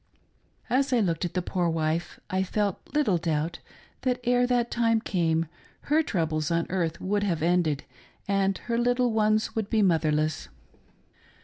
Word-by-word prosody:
As 270 Hz, +2 st, +1 dB
I 250 Hz, -, +3 dB
looked 175 Hz, -4 st, 0 dB
at 175 Hz, -, -5 dB
the 180 Hz, -, 0 dB
poor 175 Hz, -1 st, 0 dB
wife, 160 Hz, +1 st, -1 dB
I 185 Hz, 0 st, +1 dB
felt 200 Hz, 0 st, -1 dB
little 255 Hz, -, +2 dB
doubt, 160 Hz, 0 st, -1 dB, 0.4 s
that 250 Hz, -1 st, 0 dB
ere 245 Hz, 0 st, +3 dB
that 240 Hz, -1 st, +1 dB
time 230 Hz, -1 st, +2 dB
came, 165 Hz, -6 st, 0 dB, 0.4 s
her 305 Hz, +2 st, +2 dB
troubles 160 Hz, -, -1 dB
on 170 Hz, 0 st, +1 dB
earth 170 Hz, -3 st, -1 dB
would 205 Hz, +2 st, 0 dB
have 170 Hz, -6 st, -1 dB
ended 170 Hz, -4 st, +1 dB, 0.4 s
and 195 Hz, -1 st, +1 dB
her 235 Hz, -1 st, 0 dB
little 245 Hz, 0 st, +2 dB
ones 215 Hz, 0 st, +1 dB
would 220 Hz, -2 st, -2 dB
be 220 Hz, -2 st, +3 dB
motherless. 155 Hz, -4 st, +1 dB
190 Hz, 155 wpm, -27 LUFS, 165-230 Hz, 0.4 s, I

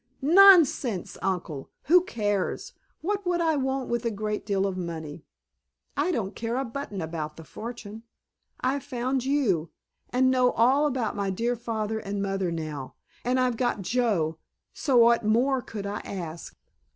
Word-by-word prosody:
"Nonsense, 320 Hz, -, +6 dB
Uncle! 175 Hz, -7 st, -3 dB
Who 350 Hz, +5 st, +5 dB
cares! 205 Hz, -, -2 dB, 0.3 s
What 405 Hz, +4 st, -1 dB
would 350 Hz, -1 st, +1 dB
I 325 Hz, -2 st, +2 dB
want 265 Hz, -1 st, -1 dB
with 235 Hz, 0 st, -1 dB
a 230 Hz, -, +1 dB
great 210 Hz, 0 st, -4 dB
lot 195 Hz, 0 st, +2 dB
of 190 Hz, -, -3 dB
money? 165 Hz, -3 st, -6 dB, 0.7 s
I -, -, +1 dB
don't 210 Hz, -, -2 dB
care 230 Hz, +1 st, -2 dB
a 270 Hz, -, -1 dB
button 230 Hz, -6 st, -5 dB
about 155 Hz, -1 st, -5 dB
the 165 Hz, -, -9 dB
fortune. 220 Hz, +3 st, -8 dB, 0.6 s
I've 265 Hz, +2 st, 0 dB
found 255 Hz, -1 st, -2 dB
you—and 255 Hz, -, 0 dB
know 255 Hz, -1 st, +3 dB
all 265 Hz, +6 st, +4 dB
about 250 Hz, -6 st, -1 dB
my 200 Hz, -1 st, -1 dB
dear 230 Hz, +6 st, 0 dB
father 220 Hz, -2 st, -3 dB
and 200 Hz, -1 st, -4 dB
mother 195 Hz, -2 st, -1 dB
now—and 160 Hz, -, -4 dB
I've 250 Hz, -2 st, +1 dB
got 240 Hz, -5 st, 0 dB
Joe, 185 Hz, -9 st, 0 dB, 0.3 s
so 270 Hz, -5 st, +1 dB
what 235 Hz, 0 st, +6 dB
more 250 Hz, +5 st, +2 dB
could 210 Hz, -4 st, -7 dB
I 200 Hz, +1 st, -3 dB
ask?" 170 Hz, -4 st, -7 dB
230 Hz, 150 wpm, -27 LUFS, 195-260 Hz, 0.7 s, Nonsense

